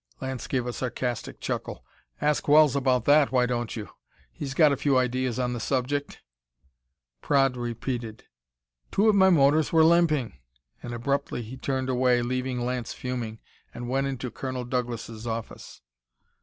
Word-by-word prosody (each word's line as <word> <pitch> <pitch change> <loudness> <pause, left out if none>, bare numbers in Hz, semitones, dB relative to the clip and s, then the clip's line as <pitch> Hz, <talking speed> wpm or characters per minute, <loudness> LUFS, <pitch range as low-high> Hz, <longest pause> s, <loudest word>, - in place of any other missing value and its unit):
Lance 130 -2 -5
gave 125 -3 -1
a 125 - -3
sarcastic 125 -1 -4
chuckle. - - -4 0.3
"Ask 150 0 0
Wells 150 -1 +6
about 130 -3 +1
that, 145 0 +5
why 125 -1 +3
don't 120 -2 -2
you? 105 -4 -6 0.5
He's 140 -2 -6
got 155 -2 +6
a - - +2
few 140 0 +2
ideas 125 -1 0
on 125 -1 -1
the 120 - -4
subject." 140 +4 -2 1.0
Praed 135 -2 +2
repeated: 120 -1 -4 0.7
"Two 205 +3 +2
of - - +5
my 190 -1 +5
motors 150 -2 +4
were 160 -1 +5
limping," 155 - +3 0.4
and 120 - -7
abruptly 125 +1 -2
he 115 +4 -8
turned 130 0 -2
away, 125 -1 +2
leaving 125 0 -2
Lance 125 -1 -3
fuming, 120 -3 -5 0.3
and 120 0 -6
went 135 +2 0
into 130 -2 -4
Colonel 130 -2 -4
Douglas' 120 -2 -4
office. 115 - -6
130 Hz, 155 wpm, -26 LUFS, 120-140 Hz, 1.0 s, Wells